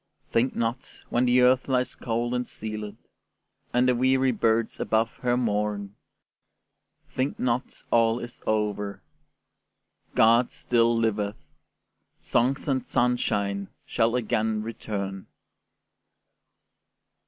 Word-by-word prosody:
Think 120 +3 +1
not, 115 +3 -3
when 120 +1 +2
the 125 0 +4
Earth 125 +1 +4
lies 125 -2 0
cold 120 0 -2
and 125 0 -1
sealèd, 105 -1 -6 0.8
And 125 +1 +3
the 125 - +4
weary 130 +1 +3
birds 115 0 +1
above 110 +1 0
her 125 -1 +1
mourn, 105 -3 -1 1.2
Think 130 +2 -1
not 125 +1 -2
all 115 0 +4
is 120 0 -8
over: 105 -3 -1 1.1
God 115 +2 +5
still 115 -1 +2
liveth, 105 -2 0 0.8
Songs 130 +6 0
and 130 -3 0
sunshine 100 -5 0 0.2
shall 115 +1 +1
again 110 -2 0
return. 100 -4 -5
115 Hz, 105 wpm, -26 LUFS, 105-125 Hz, 1.2 s, God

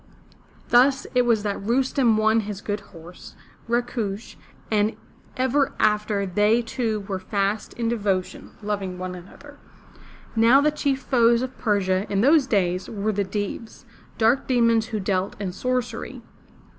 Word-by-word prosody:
*' - - -30
Thus 260 +3 +4
it 250 -1 +3
was 220 -3 +2
that 205 -1 -2
Rustem 245 +1 +2
won 220 +1 +3
his 205 -2 -5
good 205 0 -3
horse, 175 -3 -13 0.3
Rakush, 235 -3 -2 0.4
and 215 0 +1 0.4
ever 260 +2 +1
after 210 -1 +1
they 210 +5 +2
two 225 -3 -2
were 195 -1 -4
fast 200 +2 -2
in 235 -1 -2
devotion, 200 -5 -2
loving 200 -3 -3
one 185 0 -5
another. 180 +1 -13 0.8
Now 230 +4 +6
the 300 +1 +3
chief 280 -3 -1
foes 235 -1 +3
of 260 0 -5
Persia, 200 -3 0
in 200 -1 +1
those 280 +2 +4
days, 185 -5 0
were 215 0 -2
the 200 0 0
Deevs, 205 +5 -5 0.3
dark 235 +4 +2
demons 230 -3 +3
who 220 -2 -3
dealt 190 -1 -2
in 195 -3 -3
sorcery. 245 +3 -3
215 Hz, 145 wpm, -24 LUFS, 200-240 Hz, 0.8 s, Now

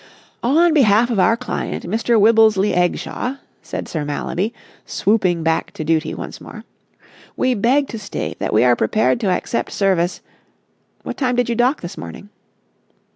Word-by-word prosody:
"On 320 +7 +3
behalf 235 -4 +4
of 220 - 0
our 225 +5 +4
client, 250 0 -4
Mr. 225 +4 +1
Wibblesley 215 -2 +4
Eggshaw," 180 +8 -1 0.3
said - - -6
Sir 155 -3 -3
Mallaby, 170 +8 -2 0.3
swooping 185 -6 0
back 160 0 0
to 155 - -5
duty 160 +1 0
once - - -8
more, - - -10 0.7
"we 255 - +2
beg 255 +6 +2
to 225 - -6
state 200 -1 -5
that - - -2
we 110 - +4
are 125 -1 +5
prepared 215 - +1
to 210 -5 0
accept 185 +5 -2
service... 185 -3 0 0.8
what - - -6
time 255 -3 0
did 245 -1 +1
you 235 - 0
dock 250 +5 +1
this 175 - -7
morning?" 85 - -9
215 Hz, 160 wpm, -19 LUFS, 175-240 Hz, 0.8 s, are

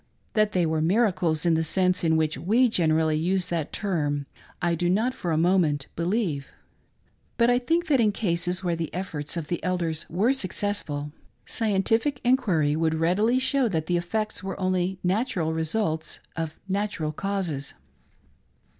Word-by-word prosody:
That 215 -1 +2
they 180 -2 +2
were 160 -1 0
miracles 175 -4 +2
in 170 - +4
the 160 0 +2
sense 185 +2 +1
in 160 -1 +3
which 155 -1 +1
we 235 +7 +3
generally 160 -5 +2
use 180 +2 0
that 165 -4 -2
term, 145 -8 -1 0.3
I 175 -1 +1
do 175 +1 0
not 220 +7 +2
for 180 - -4
a 155 - +1
moment 165 -5 +2
believe; 170 -5 -1 0.9
but 235 0 +4
I 245 - +3
think 330 +7 +1
that 290 -5 +3
in 215 -3 +4
cases 180 -2 -1
where 175 -2 0
the 165 -1 -4
efforts 170 -4 -4
of 160 -3 -4
the 175 - -3
elders 170 -3 -2
were 210 +10 +2
suc 190 -9 -2
cessful, 150 -8 -2 0.3
scientific 225 +5 +1
enquiry 185 - +2
would 160 0 +1
readily 190 +10 +2
show 260 0 +2
that 160 -5 -1
the 175 - 0
effects 215 +5 -2
were 195 0 -5
only 185 0 0
natural 180 -4 0
results 160 0 -2 0.2
of 160 -1 -4
natural 195 -5 -1
causes. 175 -5 -3
180 Hz, 165 wpm, -26 LUFS, 160-210 Hz, 0.9 s, in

